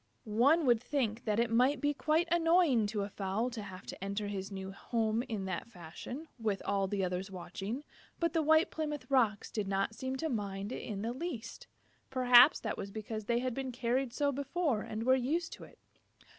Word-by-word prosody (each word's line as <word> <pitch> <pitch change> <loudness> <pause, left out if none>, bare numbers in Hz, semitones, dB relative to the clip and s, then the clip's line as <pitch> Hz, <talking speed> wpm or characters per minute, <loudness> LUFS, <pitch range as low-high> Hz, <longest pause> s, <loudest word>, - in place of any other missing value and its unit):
One 265 +10 +3
would 240 -3 +4
think 245 -5 -1
that 215 -1 +1
it 235 -1 +1
might 255 +5 +3
be 290 +2 +1
quite 315 +4 +1
annoying 330 - +4
to 205 -1 -2
a 200 - -4
fowl 200 +6 -1
to 230 -2 -5
have 190 -1 -9
to - - -8
enter 200 +1 -2
his 195 0 -4
new 190 0 -5
home 220 +2 -1
in 210 -4 -3
that 190 +4 -4
fashion, 225 - -8
with 210 -4 0
all 195 -1 +1
the 195 0 -1
others 185 +2 -2
watching, 195 +7 -5 0.4
but 335 -2 +1
the 325 - +2
White 315 +3 +4
Plymouth 300 -2 -3
Rocks 225 -6 +2
did 210 -3 -2
not 195 +2 0
seem 260 +3 -4
to 320 +5 -2
mind 200 -5 -3
it - - -4
in 205 -2 -5
the 230 +2 -2
least. 265 -4 -6 0.4
Perhaps 250 +2 +7
that - - -3
was 200 - -4
because 215 +1 -5
they 235 +1 +1
had 255 -1 -1
been 265 +1 -3
carried 250 +1 0
so 285 +3 +1
before 280 -2 -1
and 215 +1 -4
were 260 +2 +5
used 295 +7 0
to - - -10
it. - - -18
235 Hz, 205 wpm, -33 LUFS, 205-275 Hz, 0.4 s, Perhaps